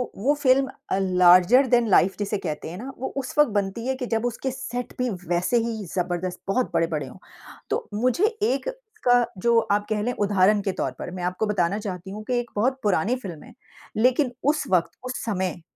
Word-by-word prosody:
वो 265 +9 +2
फ़िल्म 265 0 +4 0.2
अ, - - +2
larger 185 +7 +5
than 240 -1 +3
life 190 0 +4
जिसे 205 0 -1
कहते 160 -4 -5
हैं 175 - -7
ना, 260 +5 -7
वो 265 - -3
उस 265 -1 -3
वक़्त 295 - +6
बनती 205 +3 -2
है 265 - 0
कि 260 -1 -4
जब 225 0 -1
उसके 245 +2 -2
सेट 245 -1 -5
पे 250 -1 0 0.2
वैसे 180 +7 +2
ही 225 -3 -4
जबरदस्त 180 0 -2
बहुत 245 +6 0
बड़े-बड़े 155 -4 0
हों। - - -12 0.5
तो - - -2
मुझे 250 - +2 0.2
एक 275 - 0 0.3
का 245 -1 +5 0.2
जो 235 +2 +3
आप 205 0 +2
कह 215 -1 0
लें, 245 +3 -1
उदाहरण 205 -1 +3
के 195 -1 -1
तौर - - 0
पर - - -5
मैं 180 -1 -6
आपको 180 +4 -1
बताना 200 -1 0
चाहती 190 -2 -6
हूँ 210 +2 -7
कि 245 +2 0
एक 240 0 -6
बहुत 260 +6 +1
पुरानी 205 +3 +2
फ़िल्म 190 -11 -8
है। - - -14 0.4
लेकिन 250 +3 +3
उस 300 +2 +2
वक़्त, 175 -3 +2
उस 255 0 -5
समय, 185 -6 -2
210 Hz, 205 wpm, -24 LUFS, 185-250 Hz, 0.5 s, वक़्त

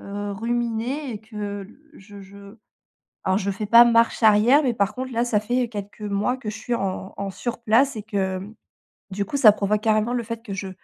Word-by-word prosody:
heu, 205 0 -5
ruminer 240 +5 -2
et 210 - -7
que 205 -2 -6 0.3
je 205 -4 -14
je 200 +2 -14 0.7
alors, 190 0 +2
je 200 -1 -2
fais 205 +2 -4
pas 235 +3 +8
marche 230 0 +2
arrière, 220 +7 +6
mais, 250 -3 +1
par 200 -3 0
contre, 260 0 -5
là, 235 +1 +1
ça 225 -4 +1
fait 245 +3 -1
quelques 205 -1 -8
mois 205 +4 -1
que 230 -5 -6
je 215 - -6
suis 240 +2 -2
en 190 -2 -4
en 200 0 -3
sur 235 +6 -5
place 235 +5 +3
et 215 - -6
que, 215 -1 -5
hem, 190 +2 -3 0.6
du 200 +1 -2
coup, 280 - -3
ça 230 -6 +8
provoque 210 0 0
carrément 215 +1 +1
le 245 -1 -1
fait 230 0 -6
que 210 -4 -7
je 195 0 -5
215 Hz, 215 wpm, -23 LUFS, 200-235 Hz, 0.7 s, pas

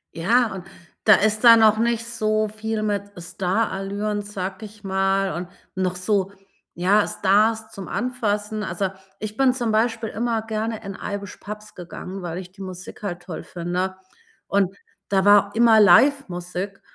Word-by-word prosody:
Ja, 225 +7 +2
und 185 -2 -8 0.4
da 215 - +8
ist 215 +2 +1
da 230 -1 +9
noch 220 -1 +5
nicht 235 0 +1
so 215 -2 0
viel 215 0 -4
mit 205 -1 -2
Starallüren, 195 +3 -2
sage 195 0 -6
ich 210 0 -14
mal 195 0 +1
und 175 +1 -5 0.3
noch 185 -1 -1
so, 195 +1 0 0.4
ja, 195 +4 +3
Stars 220 +3 +2
zum 195 -2 -8
Anfassen. 215 -1 -2
Also, 190 0 -2 0.3
ich 215 0 -6
bin 265 -2 +4
zum 240 -3 -1
Beispiel 225 +1 0
immer 225 +1 -1
gerne 220 0 -3
in 195 -1 -6
Irish 200 0 -5
Pubs 210 0 -9
gegangen, 180 +2 -8
weil 175 -1 -5
ich 180 -1 -8
die 195 +1 -14
Musik 185 -1 -8
halt 175 -4 -4
toll 175 -3 -7
finde 180 +2 -3 0.5
und 195 -1 +1 0.3
da 195 -1 +2
war 205 0 +6
immer 225 -1 +6
Livemusik. 195 -6 +3
205 Hz, 155 wpm, -23 LUFS, 190-220 Hz, 0.5 s, da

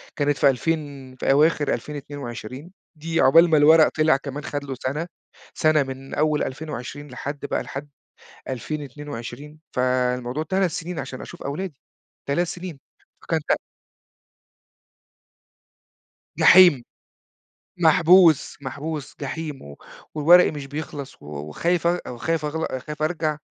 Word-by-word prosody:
كانت 145 -1 +1
في 140 - +5
ألفين 140 -2 -3
في 135 - 0
أواخر 150 +1 +3
2022. 140 0 -7 0.2
دي 165 +2 -1
عقبال 165 +5 +6
ما 155 - +4
الورق 155 +2 +7
طلع 155 -2 +3
كمان 140 +1 -7
خد 145 -1 -4
له 135 -2 -5
سنة، 150 +6 -2 0.5
سنة 155 -2 +3
من 135 0 -8
أول 150 0 +1
2020 145 0 -6
لحد 140 +3 -6
بقى - - -2
لحد 145 +2 -7 0.6
2022. 145 +1 -6 0.2
فالموضوع 125 +2 0
3 190 0 +1
سنين 165 -1 -5
عشان 130 -2 -6
أشوف - - -10
أولادي، 150 +1 -5 0.5
3 175 +5 +1
سنين، 175 -5 -7 0.4
فكان 165 -1 -1
ت - - 0 2.8
جحيم. 175 -9 +7 1.0
محبوس 165 0 +5
محبوس، 145 +2 -6
جحيم، 150 0 -5
و 70 0 -11 0.4
وورقي 170 +4 +6
مش 145 -3 -7
بيخلص 145 -1 -7
و - - -12
وخايف 75 - -2
أغ 175 +1 +2
وخايف 160 +5 -2
أغل 150 -3 -3
خايف 150 0 -7
أرجع، 155 -2 -1
150 Hz, 120 wpm, -23 LUFS, 135-160 Hz, 2.8 s, الورق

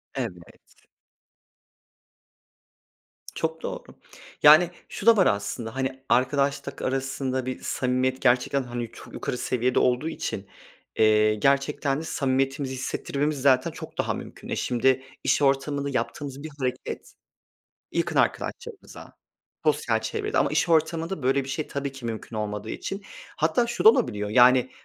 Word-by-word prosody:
Evet. 85 -1 -8 2.5
Çok 160 0 -2
doğru. - - -5 0.6
Yani, 155 +4 +8 0.2
şu 205 - -7
da 230 -2 +7
var 190 - +5
aslında. 100 +4 -2
Hani, 130 0 -3
arkadaşlık 140 +2 +1
arasında 130 -1 -2
bir 130 - -4
samimiyet, 130 0 0
gerçekten 130 +1 +2
hani, 120 -2 -5
çok - - -13
yukarı 125 - -3
seviyede 125 0 +1
olduğu 125 +6 +1
için, 100 -10 -5 0.5
eee, 110 0 +4
gerçekten 140 +3 +1
de - - -6
samimiyetimizi 135 -2 -1
hissettirmemiz 140 +2 -2
zaten 130 -2 +3
çok - - -10
daha - - 0
mümkün. - - -9
E, - - -1
şimdi 130 +2 +1 0.2
iş - - +2
ortamında 140 +1 +1
yaptığımız 140 +1 -4
bir 155 - -6
hareket, 125 -1 -4 0.8
yakın - - -1
arkadaşlarımıza, 470 0 -3 0.5
sosyal - - +1
çevrede... 425 -2 -2
Ama - - +3
iş - - +1
ortamında 165 0 +1
böyle 135 +1 +2
bir - - -9
şey 150 +2 -3
tabii 140 -1 -4
ki, 135 -3 -11
mümkün 110 0 -5
olmadığı 105 0 -4
için, 195 +1 -5 0.3
hatta 160 +10 +2
şu 235 - -3
da - - +11
olabiliyor; 105 - -1
yani 125 +2 +5
135 Hz, 135 wpm, -25 LUFS, 125-145 Hz, 2.5 s, da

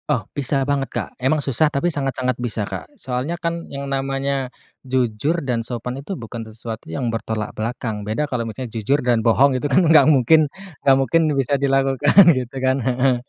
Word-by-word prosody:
Oh 125 -9 0
bisa 140 -1 0
banget, 140 -1 -1
Kak, - - -4
emang 135 +5 +2
susah 140 +3 +2
tapi 155 +4 -1
sangat-sangat 130 -3 -1
bisa, 115 -3 -2
Kak, - - -7
soalnya 135 - -3
kan 170 0 -4
yang 140 0 -6
namanya 135 -1 -2 0.3
jujur 130 +4 0
dan 120 -3 0
sopan 120 +1 -5
itu 185 +6 -6
bukan 115 0 -7
sesuatu 110 -1 -8
yang 115 +8 -2
bertolak 110 -1 -3
belakang 110 -1 -4
beda 110 +8 -2
kalau 120 -5 -3
misalnya 120 0 -7
jujur 115 +5 +1
dan 120 -2 +2
bohong 130 +5 +4
itu 145 - -1
kan 170 +6 +4
gak 155 -1 +7
mungkin 150 +2 +4 0.3
gak 135 -1 +5
mungkin 135 +5 +2 0.2
bisa 135 +1 0
dilakukan 135 +2 +1 0.2
gitu 130 -1 -4
kan 130 +1 +1
heeh, 130 +1 +2
130 Hz, 180 wpm, -21 LUFS, 115-140 Hz, 0.3 s, gak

